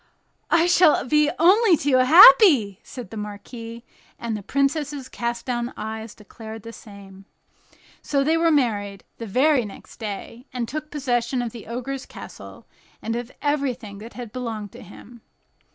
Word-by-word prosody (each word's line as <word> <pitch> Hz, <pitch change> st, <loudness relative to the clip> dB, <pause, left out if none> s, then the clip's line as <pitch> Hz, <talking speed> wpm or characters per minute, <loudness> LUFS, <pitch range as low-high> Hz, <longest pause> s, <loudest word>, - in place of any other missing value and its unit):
"I 335 Hz, 0 st, +4 dB
shall 350 Hz, -5 st, +4 dB
be 300 Hz, +2 st, +3 dB
only 375 Hz, +2 st, +5 dB
too 275 Hz, -2 st, +2 dB
happy," 265 Hz, -, +7 dB
said 245 Hz, -7 st, -10 dB
the 225 Hz, -, -7 dB
marquis, 230 Hz, +3 st, -8 dB, 0.3 s
and 230 Hz, -2 st, -4 dB
the 210 Hz, -, -5 dB
princess's 280 Hz, +3 st, -1 dB
cast 235 Hz, -2 st, -4 dB
down 240 Hz, -1 st, -3 dB
eyes 220 Hz, 0 st, -6 dB
declared 220 Hz, 0 st, -11 dB
the 230 Hz, -, -9 dB
same. 195 Hz, -3 st, -14 dB, 0.8 s
So 280 Hz, -2 st, 0 dB
they 315 Hz, +3 st, +2 dB
were 330 Hz, 0 st, +2 dB
married 205 Hz, -, 0 dB, 0.2 s
the 230 Hz, -, -6 dB
very 260 Hz, +5 st, +2 dB
next 205 Hz, -, -12 dB
day, 230 Hz, +4 st, -7 dB
and 245 Hz, -3 st, -4 dB
took 305 Hz, +4 st, -6 dB
possession 250 Hz, -3 st, -1 dB
of 235 Hz, -, -5 dB
the 230 Hz, -2 st, -11 dB
Ogre's 255 Hz, +3 st, -5 dB
castle, -, -, -12 dB, 0.3 s
and 225 Hz, -, -4 dB
of 240 Hz, +1 st, -5 dB
everything 260 Hz, -8 st, -2 dB
that 225 Hz, +3 st, -11 dB
had 240 Hz, -3 st, -8 dB
belonged 220 Hz, -5 st, -5 dB
to -, -, -13 dB
him. 220 Hz, +4 st, -14 dB
240 Hz, 155 wpm, -23 LUFS, 220-280 Hz, 0.8 s, happy